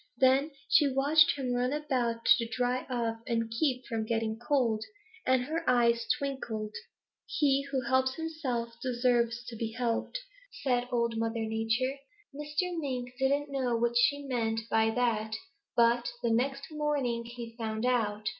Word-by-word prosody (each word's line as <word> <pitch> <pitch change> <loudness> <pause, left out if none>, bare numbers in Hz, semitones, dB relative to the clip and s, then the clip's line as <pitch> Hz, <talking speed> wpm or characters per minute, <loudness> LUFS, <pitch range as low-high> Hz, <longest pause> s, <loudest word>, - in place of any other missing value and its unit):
Then 265 +3 +4 0.2
she 290 -3 +5
watched 290 +4 +5
him 255 -3 -1
run 250 +1 +1
about 250 -6 -1
to 230 - -2
dry 245 +2 -1
off 230 -3 -1
and 230 -2 -1
keep 255 +1 0
from 225 -1 -2
getting 225 -1 -1
cold, 240 -4 +1 0.4
and 255 -1 +4
her 320 +5 -2
eyes 235 -2 +3
twinkled. 240 -7 -4 0.5
"'He 275 -1 +1
who 270 -2 0
helps 260 +1 +1
himself 275 -8 -3
deserves 240 -1 +1
to 235 - -7
be 225 0 -3
helped,' 245 - -1 0.4
said 245 -2 +1
Old 235 -2 0
Mother 225 0 -1
Nature. 225 +5 0 0.4
Mr. 300 +5 -2
Mink 250 -4 -3
didn't 280 +2 +1
know 255 -4 0
what 235 +1 +1
she 285 +4 +3
meant 225 -4 -1
by 225 0 +4
that, 220 -2 0 0.4
but 235 0 +3
the 235 - +2
next 275 +5 0
morning 290 -6 -1
he 235 -1 -8
found 220 0 -3
out. 215 -4 0
245 Hz, 150 wpm, -30 LUFS, 230-270 Hz, 0.5 s, she